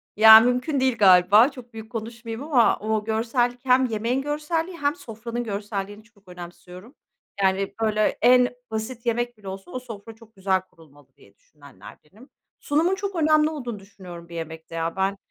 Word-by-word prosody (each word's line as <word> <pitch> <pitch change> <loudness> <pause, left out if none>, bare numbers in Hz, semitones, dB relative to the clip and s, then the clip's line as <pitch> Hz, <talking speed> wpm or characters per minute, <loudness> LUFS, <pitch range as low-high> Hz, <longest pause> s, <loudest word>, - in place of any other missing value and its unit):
Ya, 220 +1 +10
mümkün 250 +5 0
değil 260 -2 +1
galiba, 200 +4 +6
çok 250 -3 -13
büyük 220 +1 -10
konuşmayayım 230 +1 -7
ama 270 -7 +3
o 215 0 -2
görsellik, 240 +2 -1
hem 260 0 +4
yemeğin 230 +3 -1
görselliği, 320 +4 -3
hem 290 -1 0
sofranın 235 -5 -6
görselliğini 205 -1 -5
çok 210 -3 -28
önemsiyorum. 180 - -12 0.5
Yani, 195 +1 0
böyle, 215 -1 +1
en 250 +1 +5 0.2
basit 225 +2 -5
yemek 240 0 -1
bile 205 -2 -14
olsa, 190 -1 -8
o 255 - -4
sofra 225 -3 -11
çok 225 0 -20
güzel 190 -1 0
kurulmalı 155 -6 -21
diye 100 - -22
düşünenlerdenim. 150 - -17 0.3
Sunumun 325 +6 +1
çok 395 0 -5
önemli 310 -1 +3
olduğunu 245 -9 -6
düşünüyorum 180 -4 -12
bir 170 - -10
yemekte 160 0 -8
ya. 165 0 -3
Ben 195 +1 -1
225 Hz, 160 wpm, -23 LUFS, 195-250 Hz, 0.5 s, Ya